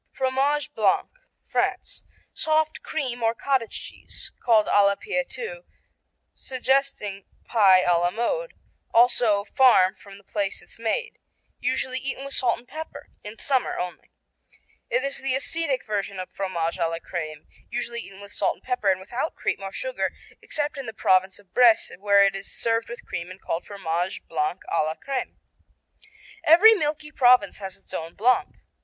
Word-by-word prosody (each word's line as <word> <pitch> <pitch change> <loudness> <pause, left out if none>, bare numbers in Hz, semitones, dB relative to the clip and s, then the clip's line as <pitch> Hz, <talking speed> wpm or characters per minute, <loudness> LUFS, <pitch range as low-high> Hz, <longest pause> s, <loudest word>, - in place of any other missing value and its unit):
Fromage 270 +3 0
Blanc - - +2 0.3
France - - -2 0.3
Soft 315 0 +1
cream 255 -6 -3
or 225 0 +2
cottage 260 -2 -1
cheese, - - -8
called 220 -3 +5
à 205 - +4
la 200 0 +4
Pie, - - -2
too, - - -6 0.7
suggesting 260 -7 -1 0.2
pie 195 -5 +5
à 175 -1 +3
la 175 - +3
mode; - - -2 0.4
also 235 -3 +4
Farm 205 -5 +5
from 200 -2 -14
the 200 - -18
place 200 0 -2
it's 175 - -11
made. 470 - -2 0.4
Usually 255 0 -1
eaten 270 +1 -5
with 275 - -4
salt 240 -2 +2
and 240 +2 -16
pepper, 315 +4 -8
in 210 +2 -8
summer 265 -3 0
only. 180 0 -5 0.8
It 250 +2 +1
is 275 0 -2
the 270 -1 0
ascetic 280 -1 -1
version 200 -2 -3
of 185 - -6
Fromage 170 -4 -2
à 165 - +2
la 165 - -3
Crème, 155 -3 -6 0.2
usually 235 0 -3
eaten 195 -2 -12
with 200 0 -11
salt - - +1
and - - -26
pepper 250 -6 0
and 190 -1 +2
without 240 +11 -4
cream - - -2
or 195 0 -5
sugar, - - -3 0.3
except 295 -1 -3
in 270 - -6
the 220 - -5
Province 190 -2 +2
of 195 -3 -19
Bresse 240 -3 +5
where 200 0 +5
it 195 - +1
is 195 0 -6
served 230 0 0
with 240 - -8
cream 170 +1 -5
and 185 +1 -10
called 165 - -3
Fromage 175 -2 -3
Blanc 160 +3 -1
à 165 - +1
la 155 +1 -2
Crème. 270 +4 -4 1.1
Every 365 +8 +8
milky 300 -5 -2
province 250 -9 +4
has 190 -2 -6
its - - -16
own 165 +1 -5
Blanc. 245 +4 +1
230 Hz, 170 wpm, -25 LUFS, 195-270 Hz, 1.1 s, Every